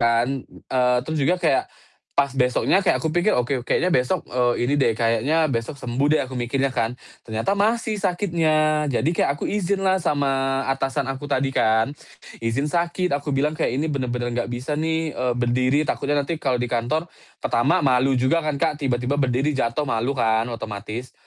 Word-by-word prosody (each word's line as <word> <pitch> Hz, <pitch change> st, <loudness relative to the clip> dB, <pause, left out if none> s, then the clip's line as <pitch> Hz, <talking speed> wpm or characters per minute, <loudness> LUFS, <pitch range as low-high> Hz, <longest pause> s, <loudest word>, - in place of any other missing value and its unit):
kan, 120 Hz, +3 st, +2 dB
eee, 125 Hz, -1 st, 0 dB
terus 155 Hz, -1 st, -2 dB
juga 170 Hz, +6 st, +2 dB
kayak 165 Hz, -6 st, +1 dB, 0.5 s
pas 140 Hz, -1 st, +2 dB
besoknya 125 Hz, +8 st, +2 dB
kayak 195 Hz, -, +2 dB
aku 160 Hz, -, -1 dB
pikir, 175 Hz, +5 st, +2 dB
"Oke 125 Hz, +1 st, 0 dB
kayaknya 175 Hz, +8 st, 0 dB
besok, 130 Hz, +8 st, +1 dB
eee, 120 Hz, -1 st, +1 dB
ini 135 Hz, -, 0 dB
deh, 115 Hz, -4 st, +3 dB
kayaknya 120 Hz, +8 st, +2 dB
besok 115 Hz, +5 st, -3 dB
sembuh 130 Hz, +2 st, -1 dB
deh," -, -, +1 dB
aku 130 Hz, -, -10 dB
mikirnya 130 Hz, +2 st, -1 dB
kan, 120 Hz, 0 st, -1 dB, 0.2 s
ternyata 110 Hz, -, -2 dB
masih 215 Hz, +1 st, 0 dB
sakitnya. 155 Hz, -5 st, +1 dB
Jadi 140 Hz, +5 st, +1 dB
kayak 140 Hz, -, +2 dB
aku -, -, -5 dB
izin 200 Hz, -1 st, -1 dB
lah 190 Hz, 0 st, +3 dB
sama 135 Hz, -3 st, 0 dB
atasan 135 Hz, 0 st, 0 dB
aku 145 Hz, +2 st, -7 dB
tadi 135 Hz, -1 st, 0 dB
kan, 110 Hz, +4 st, +2 dB, 0.5 s
izin 115 Hz, +5 st, -1 dB
sakit 175 Hz, +1 st, 0 dB
aku 145 Hz, 0 st, -1 dB
bilang 150 Hz, +3 st, +1 dB
kayak, 155 Hz, -6 st, -1 dB
"Ini 150 Hz, -, 0 dB
bener-bener 125 Hz, -2 st, -2 dB
nggak 120 Hz, -, -3 dB
bisa 125 Hz, +4 st, -4 dB
nih, 160 Hz, 0 st, -1 dB
eee, 125 Hz, -1 st, -1 dB
berdiri," 125 Hz, +4 st, +2 dB
takutnya 145 Hz, 0 st, -1 dB
nanti 160 Hz, +1 st, -4 dB
kalau 130 Hz, -2 st, +1 dB
di 125 Hz, 0 st, -2 dB
kantor, 125 Hz, +8 st, 0 dB, 0.3 s
pertama 120 Hz, +4 st, +1 dB
malu 130 Hz, 0 st, +3 dB
juga 130 Hz, +7 st, +2 dB
kan, 150 Hz, -2 st, -2 dB
Kak, 150 Hz, +2 st, -1 dB
tiba-tiba 130 Hz, +1 st, 0 dB
berdiri 135 Hz, +3 st, +1 dB
jatuh 135 Hz, +2 st, -1 dB
malu 125 Hz, +2 st, -1 dB
kan 110 Hz, -1 st, +1 dB
otomatis. 110 Hz, +2 st, -6 dB
135 Hz, 180 wpm, -23 LUFS, 125-155 Hz, 0.5 s, deh